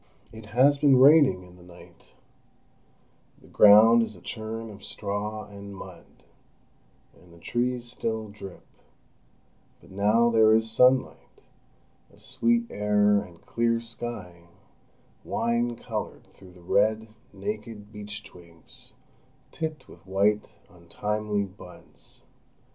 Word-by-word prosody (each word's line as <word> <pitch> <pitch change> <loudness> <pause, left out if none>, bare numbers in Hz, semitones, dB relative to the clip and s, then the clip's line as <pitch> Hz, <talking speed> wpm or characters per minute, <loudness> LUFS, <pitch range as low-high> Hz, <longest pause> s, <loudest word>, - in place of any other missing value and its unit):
It 110 -1 -12
has 135 +6 +3
been 140 -3 +5
raining 140 - +6
in 90 0 -17
the - - -17
night; 90 0 -18 1.2
the - - -21
ground 110 +3 +7
is 110 -2 -4
a - - -14
churn 110 0 -6
of 100 -1 -14
straw 105 +1 -4
and 100 -1 -11
mud, - - -13 0.9
and 90 -1 -21
the 85 - -17
trees 120 +5 -2
still 110 -3 -3
drip; 100 -3 -11 1.1
but - - -19
now 105 +5 +2
there 110 -1 +5
is 110 0 0
sunlight, 125 +3 +1 0.7
a - - -22
sweet 115 0 0
air, 105 0 +2
and 90 -4 -14
clear 115 0 0
sky, 115 -7 -8 0.8
wine 120 +1 -1
coloured - - -6
through 95 -2 -16
the 90 - -17
red, 110 +1 +1 0.2
naked, 115 - -7
beechtwigs 100 -6 -11 0.6
tipped 155 -1 -5
with - - -17
white 100 +2 +1 0.2
untimely 105 +4 -3
buds. 95 -2 -14
105 Hz, 115 wpm, -26 LUFS, 100-115 Hz, 1.2 s, ground